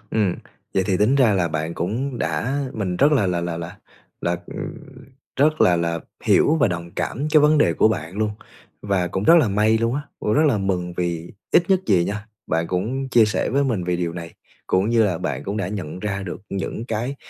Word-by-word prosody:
Ừm, 100 Hz, -5 st, +1 dB, 0.4 s
vậy 95 Hz, -, +2 dB
thì 95 Hz, -, +2 dB
tính 105 Hz, +7 st, +3 dB
ra 130 Hz, -6 st, +4 dB
là 90 Hz, -3 st, +1 dB
bạn 80 Hz, +1 st, -3 dB
cũng 120 Hz, +8 st, -3 dB
đã 135 Hz, +4 st, -1 dB
mình 95 Hz, -5 st, -2 dB
rất 145 Hz, +7 st, +4 dB
là 120 Hz, -9 st, +3 dB
là 90 Hz, -2 st, 0 dB
là 85 Hz, -1 st, -3 dB
là 85 Hz, +1 st, -7 dB, 0.4 s
là, 85 Hz, 0 st, 0 dB
ừ, -, -, -10 dB, 0.8 s
rất 155 Hz, +3 st, +2 dB
là 90 Hz, -, +5 dB
là 85 Hz, -1 st, -1 dB, 0.2 s
hiểu 155 Hz, -, +4 dB
và 120 Hz, -, +4 dB
đồng 85 Hz, -1 st, -4 dB
cảm 140 Hz, +4 st, -2 dB
cái 155 Hz, -, +6 dB
vấn 150 Hz, +1 st, +4 dB
đề -, -, +4 dB
của -, -, +4 dB
bạn 90 Hz, -2 st, -4 dB
luôn, 110 Hz, -1 st, +1 dB, 0.5 s
và 95 Hz, -3 st, 0 dB
cũng 95 Hz, +3 st, -3 dB
rất 165 Hz, -, +7 dB
là 130 Hz, -, +3 dB
may 105 Hz, +2 st, +2 dB
luôn 115 Hz, +2 st, 0 dB
á, 145 Hz, -, -2 dB, 0.2 s
cũng 105 Hz, -, 0 dB
rất 150 Hz, -, +4 dB
là 130 Hz, -8 st, +2 dB
mừng 90 Hz, -3 st, -1 dB
vì 85 Hz, -1 st, -3 dB, 0.2 s
ít 175 Hz, +2 st, +4 dB
nhất 190 Hz, -1 st, +4 dB
gì 90 Hz, -5 st, +3 dB
nha, 105 Hz, +1 st, -4 dB, 0.2 s
bạn 80 Hz, +1 st, 0 dB
cũng 120 Hz, +9 st, -2 dB
chia 120 Hz, -3 st, +5 dB
sẻ 105 Hz, -, -1 dB
với 140 Hz, +2 st, +2 dB
mình 110 Hz, -9 st, -1 dB
vì 90 Hz, 0 st, 0 dB
điều 85 Hz, -1 st, -2 dB
này, 85 Hz, -1 st, -8 dB, 0.3 s
cũng 95 Hz, +3 st, +1 dB
như 115 Hz, -1 st, +4 dB
là 90 Hz, -5 st, 0 dB
bạn 90 Hz, -, -3 dB
cũng 100 Hz, +2 st, -3 dB
đã 95 Hz, -3 st, -2 dB
nhận 90 Hz, -5 st, -5 dB
ra 100 Hz, 0 st, -3 dB
được 95 Hz, 0 st, -6 dB
những 100 Hz, +3 st, -4 dB
cái 120 Hz, +4 st, -3 dB
100 Hz, 230 wpm, -22 LUFS, 90-120 Hz, 0.8 s, rất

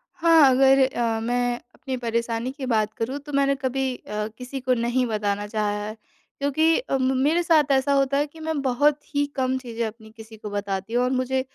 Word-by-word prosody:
हाँ। 325 Hz, -4 st, +6 dB
अगर 270 Hz, +1 st, +5 dB
अ, 235 Hz, -3 st, -1 dB
मैं 245 Hz, +1 st, 0 dB, 0.2 s
अपनी 260 Hz, 0 st, -5 dB
परेशानी 235 Hz, 0 st, -2 dB
की 275 Hz, 0 st, -7 dB
बात 220 Hz, -3 st, 0 dB
करूँ 255 Hz, +5 st, -3 dB
तो 290 Hz, +1 st, -11 dB
मैंने 275 Hz, 0 st, +2 dB
कभी 265 Hz, -1 st, -2 dB
अ, 210 Hz, -2 st, -5 dB
किसी 255 Hz, +2 st, -6 dB
को 255 Hz, 0 st, +1 dB
नहीं 245 Hz, +1 st, 0 dB
बताना 205 Hz, -2 st, -2 dB
चाहा 210 Hz, 0 st, -1 dB, 0.2 s
है। 215 Hz, -, -6 dB, 0.4 s
क्योंकि 315 Hz, +4 st, +2 dB
अ, 485 Hz, -, -2 dB
म -, -, -2 dB
म -, -, -1 dB
मेरे 330 Hz, +4 st, +2 dB
साथ 310 Hz, -4 st, +3 dB
ऐसा 270 Hz, +1 st, +3 dB
होता 275 Hz, 0 st, +2 dB
है 290 Hz, +1 st, +1 dB
कि 320 Hz, +2 st, -16 dB
मैं 315 Hz, -2 st, -2 dB
बहुत 280 Hz, +3 st, +2 dB, 0.2 s
ही 285 Hz, 0 st, +2 dB
कम 260 Hz, -1 st, 0 dB
चीज़ें 235 Hz, -3 st, -4 dB
अपनी 220 Hz, 0 st, -11 dB
किसी 220 Hz, 0 st, -12 dB
को 210 Hz, 0 st, -7 dB
बताती 205 Hz, +1 st, -4 dB
हूँ 245 Hz, -, +2 dB
और 250 Hz, -, +1 dB
मुझे 260 Hz, 0 st, 0 dB
255 Hz, 215 wpm, -24 LUFS, 230-275 Hz, 0.4 s, हाँ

